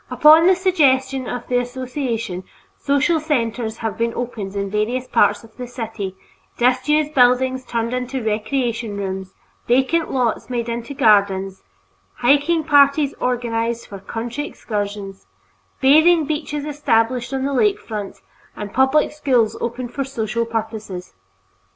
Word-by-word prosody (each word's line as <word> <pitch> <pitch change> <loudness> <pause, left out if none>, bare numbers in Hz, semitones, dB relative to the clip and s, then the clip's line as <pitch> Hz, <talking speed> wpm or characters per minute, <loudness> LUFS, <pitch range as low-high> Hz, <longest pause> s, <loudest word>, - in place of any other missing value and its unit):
Upon 315 +3 +6
the 375 - +6
suggestion 270 -8 +2
of 245 - -5
the 245 -1 +2
association, 245 -6 -4 0.3
social 285 +4 +1
centers 235 -7 -2
have 220 - -3
been 230 0 0
opened 215 -5 -5
in 200 -1 -3
various 235 +5 -1
parts 205 +1 +2
of 220 -1 -17
the 250 -1 -6
city, 225 -6 -5 0.4
disused 290 +5 +2
buildings 255 0 +3
turned 230 -1 -2
into 250 0 -3
recreation 225 0 -2
rooms, 190 -1 -5 0.3
vacant 265 +7 +2
lots 250 -3 -1
made 240 -2 -2
into 235 +4 -5
gardens, 195 -4 +2 0.5
hiking 290 +6 +2
parties 285 -1 +4
organized 235 -1 -1
for 200 - -9
country 235 +8 -5
excursions, 205 - -5 0.5
bathing 315 +4 +5
beaches 295 -1 -3
established 250 -4 0
on 265 0 -2
the 280 - -1
lake 405 +9 +2
front, 210 -3 -7 0.3
and 205 -1 -7
public 265 +3 +3
schools 255 -7 +1
opened 240 +1 -4
for 275 - -1
social 230 -3 -2
purposes. 220 - -5
245 Hz, 130 wpm, -20 LUFS, 220-275 Hz, 0.5 s, Upon